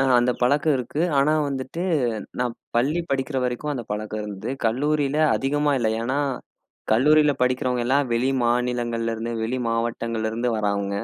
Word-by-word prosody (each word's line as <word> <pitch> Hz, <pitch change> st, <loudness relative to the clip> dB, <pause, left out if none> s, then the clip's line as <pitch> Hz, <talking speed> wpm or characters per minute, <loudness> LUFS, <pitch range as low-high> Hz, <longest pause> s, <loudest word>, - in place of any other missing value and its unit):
அ -, -, +4 dB, 0.2 s
அந்த 120 Hz, +1 st, +3 dB
பழக்கம் 145 Hz, +4 st, +3 dB
இருக்கு. 125 Hz, +5 st, -4 dB, 0.2 s
ஆனா 150 Hz, +3 st, +4 dB, 0.2 s
வந்துட்டு, 135 Hz, +5 st, -4 dB, 0.6 s
நான் 125 Hz, -1 st, -1 dB, 0.2 s
பள்ளி 145 Hz, +8 st, +2 dB
படிக்கிற 135 Hz, +1 st, -1 dB
வரைக்கும் 125 Hz, +4 st, -2 dB
அந்த 120 Hz, -3 st, -5 dB
பழக்கம் 110 Hz, 0 st, -4 dB
இருந்தது. 105 Hz, +3 st, -5 dB, 0.2 s
கல்லூரியில 145 Hz, +4 st, +1 dB, 0.2 s
அதிகமா 145 Hz, +2 st, 0 dB
இல்ல. 115 Hz, -3 st, +1 dB
ஏன்னா, 130 Hz, +4 st, -1 dB, 0.7 s
கல்லூரியில 150 Hz, +5 st, +5 dB
படிக்கிறவங்க 125 Hz, -1 st, +1 dB
எல்லாம் 135 Hz, +1 st, +2 dB
வெளி 125 Hz, +3 st, +1 dB
மாநிலங்கள்ல 120 Hz, -1 st, 0 dB
இருந்து, 115 Hz, +1 st, -4 dB
வெளி 125 Hz, +3 st, -1 dB
மாவட்டங்கள்ல 115 Hz, -1 st, -1 dB
இருந்து 120 Hz, +2 st, -1 dB
வரவங்க. 100 Hz, -1 st, -1 dB
125 Hz, 145 wpm, -24 LUFS, 115-140 Hz, 0.7 s, கல்லூரியில